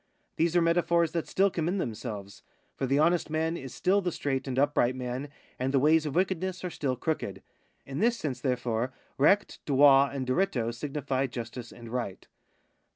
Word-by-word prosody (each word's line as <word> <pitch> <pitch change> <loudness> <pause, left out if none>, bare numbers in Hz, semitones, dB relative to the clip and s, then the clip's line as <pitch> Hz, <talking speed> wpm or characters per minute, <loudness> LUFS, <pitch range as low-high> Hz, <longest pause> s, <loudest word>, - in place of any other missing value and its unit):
These 165 +1 +1
are 175 - +5
metaphors 170 0 +2
that 165 -2 -2
still 195 +1 +2
commend 175 +4 -1
themselves; 105 - -5 0.3
for 135 - -2
the 135 +2 +2
honest 170 +2 +2
man 160 +2 0
is 135 -6 -7
still 200 +2 +2
the 180 -2 -1
straight 135 -3 -2
and 130 -1 -3
upright 135 -3 +2
man, 130 +2 -4 0.3
and 130 +1 0
the 140 - +3
ways 155 +3 +4
of 145 - -4
wickedness 185 0 0
are 180 - -3
still 135 -5 -1
crooked. 160 +5 -3 0.4
In 135 +1 -5
this 235 +3 +3
sense, 130 - -4
therefore, 125 -1 -1 0.3
recht, 195 +9 +3
droit, 140 -1 +6
and 130 -2 -2
diritto 125 -5 0
signify 135 0 -2
justice 120 0 -7
and 120 -1 -11
right. 115 -5 -4
140 Hz, 175 wpm, -29 LUFS, 125-170 Hz, 0.4 s, droit